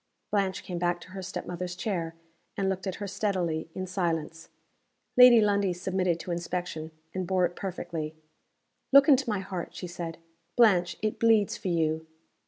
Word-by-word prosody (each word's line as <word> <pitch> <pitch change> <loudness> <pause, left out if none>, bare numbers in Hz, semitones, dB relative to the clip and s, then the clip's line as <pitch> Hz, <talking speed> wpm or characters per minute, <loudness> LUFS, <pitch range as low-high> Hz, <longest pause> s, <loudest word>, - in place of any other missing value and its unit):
Blanche 195 -2 0
came 175 -2 -4
back 175 0 0
to 180 - -13
her 190 0 -6
step 185 +1 -5
mother's 180 0 -4
chair; 175 -4 -3 0.4
and 195 -1 0
looked 190 +1 -3
at 185 - -2
her 205 - -5
steadily, 185 -5 -1
in 185 - -3
silence. 165 -3 -2 0.7
Lady 250 -2 +9
Lundie 200 -3 +2
submitted 180 -1 -1
to 180 - -5
inspection 170 -2 -3 0.2
and 185 -1 -3
bore 185 -1 +3
it 175 0 -4
perfectly. 165 -5 -4 0.8
"Look 275 0 +8
into 275 -4 +5
my 205 -3 0
heart," 185 -2 -6
she - - -5
said. 170 -2 -6 0.4
"Blanche! 180 -7 +4
it 215 - -1
bleeds 225 -3 +4
for - - -6
you!" 160 -2 0
185 Hz, 170 wpm, -28 LUFS, 170-200 Hz, 0.8 s, Lady